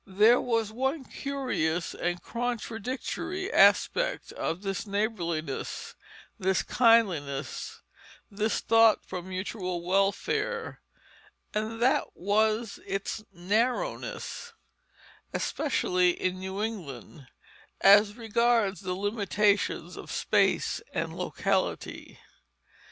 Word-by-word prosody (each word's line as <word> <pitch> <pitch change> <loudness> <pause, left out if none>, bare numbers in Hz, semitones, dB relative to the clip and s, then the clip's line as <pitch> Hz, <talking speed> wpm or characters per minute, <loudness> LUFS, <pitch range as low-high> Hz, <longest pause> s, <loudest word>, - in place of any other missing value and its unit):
There 210 +5 +5
was 230 -3 0
one 265 +5 -1
curious 250 - -2
and 175 0 -3
contradictory 245 - -3
aspect 205 - +3
of 170 +5 -3
this 195 +1 -3
neighborliness, 175 - -2 0.5
this 190 0 +1
kindliness, 185 - +1 0.5
this 210 +2 0
thought 225 -1 +5
for 185 -1 -5
mutual 185 -1 -4
welfare, 415 - 0 0.7
and 215 +2 -2
that 260 - +3
was 215 +3 +1
its 195 +2 -3
narrowness, 235 - -2 0.8
especially 180 - +1
in 185 0 -1
New 190 +2 -4
England, 155 - -6 0.5
as 205 +1 +6
regards 225 -4 +1
the 185 -2 -3
limitations 205 0 0
of - - -9
space - - +1
and - - -2
locality. - - -2
205 Hz, 90 wpm, -28 LUFS, 185-235 Hz, 0.8 s, as